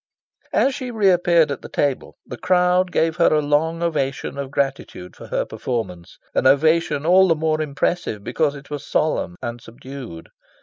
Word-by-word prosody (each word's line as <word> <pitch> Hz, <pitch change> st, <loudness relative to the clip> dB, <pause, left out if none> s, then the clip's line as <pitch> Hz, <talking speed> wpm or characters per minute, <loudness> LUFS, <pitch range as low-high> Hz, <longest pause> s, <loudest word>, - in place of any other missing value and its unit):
As 270 Hz, -, +2 dB
she 255 Hz, -2 st, -5 dB
re 215 Hz, -5 st, +3 dB
appeared 170 Hz, -3 st, +3 dB
at 140 Hz, -, -4 dB
the -, -, -10 dB
table, 140 Hz, -3 st, -1 dB
the -, -, -7 dB
crowd 180 Hz, +3 st, +2 dB
gave 165 Hz, 0 st, +1 dB
her 170 Hz, -, +4 dB
a 155 Hz, -, +3 dB
long 155 Hz, +3 st, 0 dB
ovation 140 Hz, -6 st, -2 dB
of 140 Hz, -1 st, -5 dB
gratitude 135 Hz, -10 st, -3 dB
for -, -, -11 dB
her -, -, -1 dB
performance 90 Hz, -9 st, -5 dB, 0.2 s
an 130 Hz, -, +2 dB
ovation 150 Hz, +1 st, +3 dB
all 185 Hz, +3 st, +6 dB
the 165 Hz, -, +3 dB
more 155 Hz, 0 st, 0 dB
impressive 145 Hz, -, -2 dB
because 145 Hz, +6 st, 0 dB
it 140 Hz, +1 st, -13 dB
was 145 Hz, -1 st, -5 dB
solemn 145 Hz, -, -1 dB
and 120 Hz, -1 st, -5 dB
subdued. 120 Hz, -7 st, -10 dB
150 Hz, 175 wpm, -21 LUFS, 135-170 Hz, 0.2 s, all